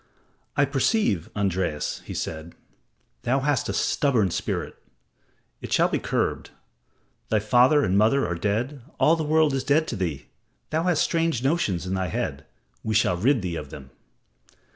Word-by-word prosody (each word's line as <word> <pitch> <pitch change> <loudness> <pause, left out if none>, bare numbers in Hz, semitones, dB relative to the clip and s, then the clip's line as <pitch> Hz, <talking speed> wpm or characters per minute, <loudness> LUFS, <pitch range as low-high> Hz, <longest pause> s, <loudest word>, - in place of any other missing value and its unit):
"I 145 - +5
perceive, 135 - +1
Andreas," 95 -6 -1
he - - -7
said, 80 +1 -5 0.7
"thou 130 +2 +1
hast 145 -3 0
a - - -1
stubborn 120 - +1
spirit. - - -3 0.9
It - - -8
shall - - +3
be - - 0
curbed. - - -2 0.8
Thy 110 - +2
father 125 +7 +4
and 95 - +1
mother 110 +7 +3
are 85 - -2
dead 110 - -2 0.2
all 160 - +5
the 160 - -2
world 155 -1 +3
is 135 - -1
dead 155 +3 +2
to - - -3
thee. 85 -8 -3 0.5
Thou 160 +2 0
hast 180 -4 +2
strange 165 -7 0
notions 120 - 0
in 90 - -3
thy 95 -1 -1
head. - - -4 0.4
We 110 0 -1
shall 105 -5 +3
rid 115 +5 +2
thee 90 -2 -3
of - - -6
them." 65 0 -11
120 Hz, 165 wpm, -25 LUFS, 95-145 Hz, 0.9 s, I